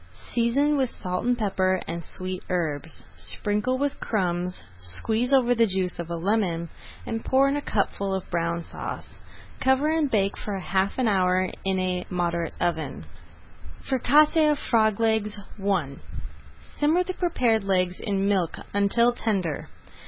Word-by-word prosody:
Season 275 +5 +2
with 260 -3 +1
salt 180 -4 -4
and 245 0 +2
pepper 190 -4 +1
and 170 +1 -4
sweet 185 +2 -4
herbs. 160 -4 -3
Sprinkle 210 +5 -1
with 285 +1 -1
crumbs, 180 -3 -1 0.2
squeeze 220 - 0
over 250 -3 +5
the 230 -1 +3
juice 185 -2 -1
of 170 -1 -5
a 170 - -2
lemon, 170 -2 0 0.4
and 225 0 -3
pour 270 +1 +4
in 275 - +1
a 290 - -1
cupful 200 -4 -1
of 190 - -5
Brown 170 0 -1
Sauce. - - -7 0.4
Cover 265 +3 +3
and 315 -2 +1
bake 200 -4 +1
for 205 -2 -4
half 190 +1 0
an 255 -2 +2
hour 185 -2 +2
in 190 0 0
a 185 -1 -1
moderate 170 -2 -1
oven. 160 - -2 0.8
[Page - - -10
154] 265 - +2
FRICASSÉE 300 +4 +5
OF 295 - +1
FROG 220 -6 +2
LEGS 220 -2 +1 0.2
I 175 -9 0 0.8
Simmer 315 +5 +3
the 370 +1 -4
prepared 245 - +1
legs 185 -2 +1
in 200 -2 -1
milk 190 -5 +1 0.2
until 220 +4 +3
tender. 190 -10 -2
200 Hz, 155 wpm, -25 LUFS, 180-245 Hz, 0.8 s, over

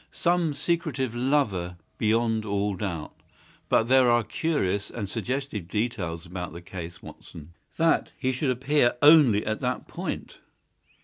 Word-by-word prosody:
Some 170 -3 +1
secretive 145 -5 -1
lover, 120 -9 0 0.2
beyond 115 0 +1
all 100 -1 -1
doubt. 85 -5 -4 0.6
But - - +4
there 130 +1 +4
are 120 -1 +4
curious 105 - -1
and 105 -4 -5
suggestive 125 -4 -4
details 95 -6 -3
about 90 -1 -6
the 85 - -8
case, 85 -2 -8
Watson." 80 +1 -12 0.2
"That 165 0 +2
he 130 - 0
should 130 +2 -1
appear 130 +1 +2
only 145 -9 +7
at 110 0 -2
that - - -2
point?" - - -6
115 Hz, 135 wpm, -26 LUFS, 95-135 Hz, 0.6 s, only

